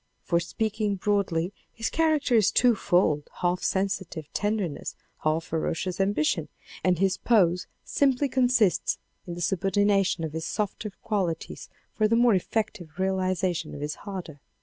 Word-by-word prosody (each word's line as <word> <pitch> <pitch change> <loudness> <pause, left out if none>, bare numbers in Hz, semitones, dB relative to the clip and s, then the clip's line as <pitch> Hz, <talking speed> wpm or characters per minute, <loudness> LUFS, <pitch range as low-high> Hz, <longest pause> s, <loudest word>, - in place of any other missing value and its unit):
For 170 - +2
speaking 210 +3 -1
broadly 195 -3 0 0.2
his 225 0 -3
character 310 -5 +2
is 220 -4 +5
two 245 -1 +4
fold, 175 -7 +1
half 180 0 +1
sensitive 190 -5 -2
tender 205 -2 0
ness, 145 - -6 0.2
half 155 +1 0
ferocious 165 +3 -2
ambition, 205 +11 +1 0.3
and 180 -1 +3
his 190 +1 +2
pose 180 -6 +3 0.2
simply 280 0 +2
con 260 -1 +2
sists 225 -7 +2 0.3
in 175 - -5
the 175 - -6
subordination 195 0 +2
of 155 -2 -3
his 160 0 -3
softer 210 0 -2
qualities 185 -7 -2 0.2
for 215 - +2
the 230 - +2
more 240 -1 +5
effective 190 -3 -2
realization 185 -3 0
of 145 - -7
his 150 0 -2
harder. 180 -7 -7
190 Hz, 150 wpm, -27 LUFS, 170-215 Hz, 0.3 s, is